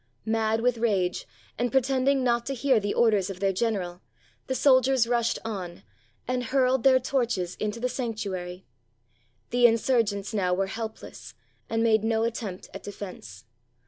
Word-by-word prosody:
Mad 220 0 +1
with 245 -1 +1
rage, 195 -6 0 0.3
and 245 -1 0
pretending 265 +1 +2
not 240 -1 +2
to 275 - -2
hear 260 -1 +3
the 205 0 -2
orders 210 -5 +3
of 190 -2 -7
their 195 0 +1
general, 185 -4 -2 0.5
the 260 - -1
soldiers 260 -2 +4
rushed 235 -1 +1
on, 185 -6 -6 0.4
and 250 0 -1
hurled 260 0 +2
their 260 +1 +5
torches 235 -9 -1
into 215 +2 -3
the 250 - 0
sanctuary. 200 -8 -4 0.9
The 245 0 +6
insurgents 225 -3 +1
now 180 -4 +1
were 195 +1 0
helpless, 190 - -7 0.3
and 225 0 0
made 220 -2 +3
no 225 0 +1
attempt 225 -5 -4
at - - -7
defense. 180 - -9
225 Hz, 150 wpm, -26 LUFS, 195-245 Hz, 0.9 s, The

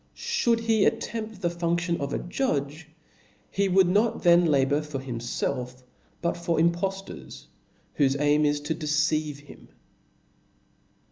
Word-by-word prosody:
Should 230 -1 0
he. 225 -3 +2
attempt 220 -4 -2
the 175 - +2
fundion 170 0 -1
of 140 0 -3
a - - -1
judge^ 155 - -2 0.7
he 200 0 +1
would 190 0 +5
not 210 +5 +1
then 175 0 +6
labour 140 0 +2
for 150 -2 -6
himfelf^ 125 0 -4 0.4
but 170 - 0
for 170 -1 -1
im*^ 170 +1 +4
tK)ftors, 195 +3 -6 0.5
whofe 140 -1 +3
aim 150 +1 +3
is 145 0 +2
to 150 +2 -2
deceive 150 -1 0
him. 145 - -15
160 Hz, 135 wpm, -26 LUFS, 145-185 Hz, 0.7 s, then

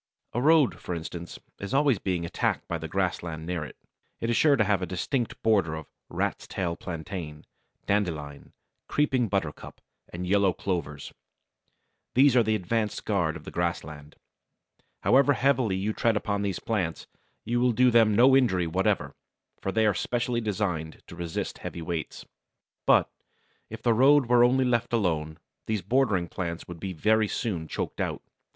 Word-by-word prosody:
A 120 - 0
road, 155 -1 +4
for 90 - -4
instance, 85 +1 -7 0.2
is 100 +7 -3
always 140 -5 +3
being 90 -3 -2
attacked 85 - -1
by 85 - -3
the 80 - -5
grassland 85 -3 -2
near 85 -2 -2
it. - - -10 0.4
It 115 - -1
is - - +1
sure 145 +4 +5
to 115 - +3
have 100 -2 +1
a 90 - -2
distinct 115 - -2
border 100 -8 +2
of 80 -1 -7 0.2
Rat's - - -2
Tail 85 -2 -2
Plantain, 80 -3 -7 0.4
Dandelion, 80 -8 -2 0.3
Creeping 130 -5 +1
Buttercup, 95 -7 -3 0.3
and 90 +1 -5
Yellow 100 0 +3
Clovers. 80 -8 -4 1.0
These 135 0 +6
are 125 - +6
the 110 -1 +1
advanced 105 +2 -2
guard 90 -6 0
of - - -9
the - - -8
grassland. 80 -4 -4 0.9
However 140 +3 +5
heavily 130 -6 +2
you 100 +3 -1
tread 115 -1 +1
upon 100 -1 -1
these 100 -3 -1
plants, 95 -8 -2 0.4
you 120 +2 0
will 125 0 +3
do 125 +2 +4
them 110 -3 +5
no 130 +4 +6
injury 95 -10 +3
whatever, 90 +4 0 0.5
for 95 - -2
they 110 +2 +2
are 105 - +3
specially 120 +4 -1
designed 90 -7 -3
to - - -9
resist 85 -2 -4
heavy 85 - -6
weights. 85 -1 -5 0.6
But, - - +5 0.6
if - - -9
the 120 - +4
road 135 +4 +5
were 120 0 +5
only 130 +2 +3
left 120 -1 0
alone, 80 -8 0 0.3
these 110 -4 -1
bordering 105 -5 +1
plants 85 -1 -5
would 85 -1 -8
be 95 +3 -4
very 110 +5 +2
soon 90 -7 -3
choked - - -4
out. - - -3
100 Hz, 165 wpm, -27 LUFS, 85-120 Hz, 1.0 s, These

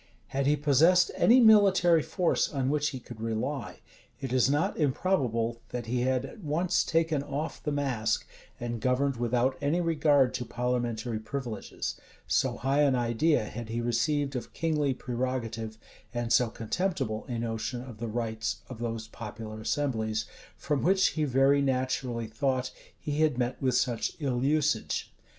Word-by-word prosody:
Had 135 0 0
he 145 - +4
possessed 155 +5 +4
any 245 +3 +5
military 195 -7 +6
force 180 +3 0
on 135 -2 0
which 150 -1 +1
he 130 - -6
could 120 -2 -11
rely, 115 +3 -3 0.4
it 130 -2 -4
is 130 0 +4
not 150 +8 +1
improbable, 125 - 0
that 120 -1 -4
he 120 +2 -1
had 130 +1 +1
at 220 - -11
once 170 +2 +1
taken 160 -3 +1
off 145 +3 -4
the 150 - -2
mask, 135 -6 0 0.3
and 120 -1 -4
governed 130 +2 +1
without 120 +2 +1
any 145 +5 +1
regard 150 -6 +3
to - - -2
parliamentary 120 -2 -2
privileges: 115 -3 -5 0.2
so - - +1
high 135 +3 +1
an 140 -3 +4
idea 120 +5 +2
had 115 +1 -7
he 115 +1 -2
received 135 +4 0
of 125 - -5
kingly 150 -5 0
prerogative, 120 -3 -3 0.4
and 120 -1 0
so 125 -2 +4
contemptible 115 - -2
a 120 - -3
notion 115 +2 -3
of 120 -5 -10
the 120 - -3
rights 115 0 -3
of 125 -3 -8
those 115 -2 -4
popular 110 0 -8
assemblies, 110 -4 -1 0.3
from 145 -2 -1
which, 190 +2 +4
he 155 -2 -1
very 135 +1 +4
naturally 130 -3 -1
thought, 130 +3 -1 0.3
he 150 0 -3
had 155 -5 +3
met 125 0 -2
with 130 -2 +1
such 125 -2 0
ill 130 -4 -1
usage. 145 -4 0
130 Hz, 160 wpm, -29 LUFS, 115-145 Hz, 0.4 s, military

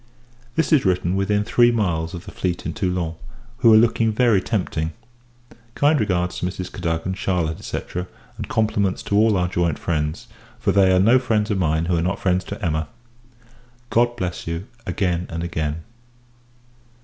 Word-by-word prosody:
This 165 0 +1
is 145 - +5
written 90 -1 +1
within 105 +1 +1
three 120 +2 +4
miles 85 -7 -1
of 85 - -8
the - - -9
fleet 90 -2 -3
in - - -3
Toulon, 90 -4 -1 0.4
who 120 -3 +5
are 110 - +8
looking 115 0 +3
very 110 -3 +3
tempting. 85 -7 -2 0.8
Kind 145 +1 +3
regards 90 -4 0
to - - -2
Mrs. 90 0 -5
Cadogan, 85 0 -2
Charlotte, 90 -4 -2
&c. - - -3 0.6
and - - -6
compliments 105 -4 0
to 100 - -1
all 105 -1 +4
our 90 -1 +1
joint 85 -4 0
friends; 75 -1 -2 0.3
for - - 0
they 95 -2 +4
are 95 - +4
no 115 +7 +5
friends 110 -4 0
of 100 - 0
mine, 80 -1 +1
who 85 0 +1
are - - +1
not 90 +3 -1
friends 90 -1 +1
to 100 +1 -5
Emma. 80 -1 -1 1.0
God 120 +1 +3
bless 90 -6 -4
you, 85 +3 -3 0.2
again 90 -3 -1
and 85 0 -4
again! 80 -2 -3
95 Hz, 175 wpm, -22 LUFS, 85-110 Hz, 1.0 s, are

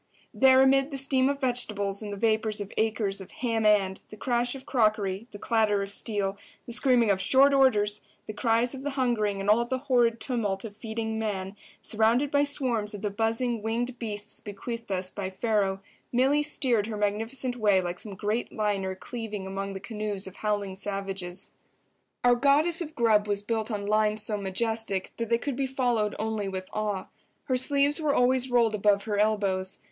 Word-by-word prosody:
There 265 0 +6
amid 270 +1 +4
the 275 - -4
steam 265 0 +2
of 280 0 -2
vegetables 210 -6 -1
and 210 -1 -5
the 200 - -5
vapours 220 0 +1
of 205 -1 -6
acres 215 -3 0
of 190 - -10
"ham 225 -3 0
and," 195 -2 +2
the 215 - -11
crash 245 +2 0
of 265 - -10
crockery, 215 -3 +1
the 205 - -8
clatter 210 -2 +1
of 195 - -6
steel, 200 -2 -2 0.3
the - - -8
screaming 240 -4 +4
of 190 -1 0
"short 270 +8 +5
orders," 210 -7 +3 0.2
the 215 - -6
cries 230 +2 +1
of 265 - -7
the 290 - -2
hungering 215 -6 +1
and 195 - -4
all 215 +3 +5
the 260 +2 -2
horrid 245 -4 +2
tumult 210 -7 -2
of 205 -2 -8
feeding 220 0 -4
man, 195 -3 -3 0.3
surrounded 230 +6 +2
by 285 0 +4
swarms 240 -7 -1
of 205 - -9
the 205 - -1
buzzing 225 +2 -1
winged 240 +3 -2
beasts 210 -3 -6
bequeathed 230 +2 -6
us 185 -1 -1
by 195 -2 -4
Pharaoh, 195 -1 0 0.3
Milly 270 +4 +3
steered 250 -7 +1
her 220 -2 -4
magnificent 225 +5 -1
way 210 -5 +3
like 180 0 -3
some 205 -3 -7
great 210 +5 -2
liner 200 -3 -1
cleaving 215 -1 -6
among 195 +1 -4
the 190 - -5
canoes 210 -2 -4
of 190 - -9
howling 205 -2 -1
savages. 195 -2 -3 0.7
Our 245 0 +6
Goddess 290 +7 +3
of 315 -2 -6
Grub 215 -3 +3
was 205 0 -1
built 220 0 -2
on 205 -3 -3
lines 215 0 +1
so 215 - -1
majestic 205 0 -2
that 230 -1 -3
they 235 - +3
could 275 +2 -3
be 270 +1 -1
followed 245 -5 0
only 215 -2 -2
with 185 -1 -5
awe. 210 -3 -2 0.3
Her 260 - 0
sleeves 285 +4 +3
were 295 -2 +1
always 255 +1 +3
rolled 235 -3 +3
above 205 -1 +2
her 205 -2 -2
elbows. 200 -3 0
220 Hz, 190 wpm, -27 LUFS, 200-245 Hz, 0.7 s, There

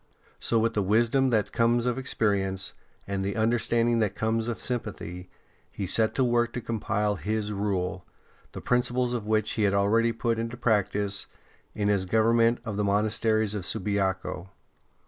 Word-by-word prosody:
So 115 - +1
with 115 +1 +1
the 105 - +1
wisdom 115 +7 +2
that 105 -4 +1
comes 120 +1 +2
of 125 +1 0
experience 100 -6 -1 0.3
and 100 -1 -2
the 100 +1 -2
understanding 115 +1 +2
that 105 -3 0
comes 110 +1 -1
of 120 - -3
sympathy, 95 -7 -4 0.4
he 100 - -3
set 110 +4 +1
to 135 - +2
work 120 -1 +1
to - - -3
compile 105 -2 -1
his 105 0 -2
Rule, 95 -2 -2 0.5
the - - -7
principles 125 0 +1
of 115 -4 -3
which 110 -1 +1
he 110 - -2
had 100 -1 +2
already 115 +4 +3
put 115 0 -1
into 115 +1 -4
practice 100 -3 0 0.5
in 105 -1 0
his 100 -2 +2
govern 110 +3 +3
ment 115 +1 +3
of 105 -3 -4
the 105 - +1
monasteries 110 +1 +1
of 105 -3 -3
Subiaco. 95 -2 -1
110 Hz, 165 wpm, -27 LUFS, 100-115 Hz, 0.5 s, already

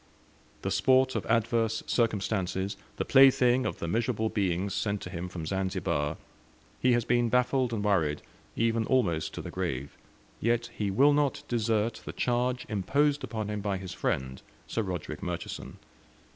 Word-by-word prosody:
The - - -1
sport 130 0 +4
of 100 -7 -2
adverse 115 0 +1
circumstances, 100 -3 0 0.2
the - - -1
plaything 130 -2 +5
of 95 - -4
the 85 - -4
miserable 110 +2 0
beings 95 -2 -1
sent 105 -1 -1
to 90 - -7
him 90 0 -5
from 85 -3 -6
Zanzibar 80 -5 -1 0.6
he 125 -1 +3
has 120 -1 +1
been 120 -1 +2
baffled 125 +1 +2
and 110 -3 -2
worried, 80 -8 +1 0.3
even 115 -1 +1
almost 85 -12 +1
to - - -5
the - - -6
grave, 65 +2 -3 0.4
yet 120 +1 0
he 105 -2 -1
will 140 +9 +5
not 145 -2 +1
desert 115 -1 0
the - - -7
charge 125 +1 0
imposed 140 +9 +1
upon 110 -2 -3
him 105 -1 -3
by 100 -1 -1
his 95 -1 -7
friend, 65 0 -2 0.2
Sir 115 - -2
Roderick 90 -6 -5
Murchison. - - -5
110 Hz, 160 wpm, -29 LUFS, 95-120 Hz, 0.6 s, plaything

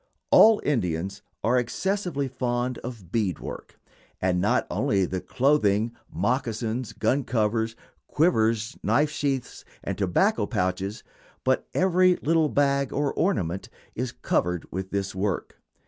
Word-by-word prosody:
All 220 -1 +8
Indians 100 - -1 0.2
are 125 +3 +3
excessively 175 - -1
fond 125 -1 -2
of 115 -8 -8
bead 100 -6 0
work, - - -9 0.4
and 90 -1 +1
not 105 - +2
only 95 -2 +1
the 95 0 -3
clothing, 120 -5 +2 0.2
moccasins, 120 -1 -1
gun 140 +2 0
covers, 110 -1 0 0.3
quivers, 115 -7 +2
knife 150 +1 +2
sheaths, 140 -4 -2 0.2
and - - -3
tobacco - - +2
pouches, 95 +3 -2 0.4
but 130 0 +1
every 185 0 +4
little 160 -1 +2
bag 140 -1 +1
or 145 0 0
ornament, 95 - -1 0.2
is 125 +1 -3
covered 90 -6 -1
with 95 +1 -4
this 100 0 -2
work. 95 0 -3
120 Hz, 125 wpm, -26 LUFS, 100-140 Hz, 0.4 s, All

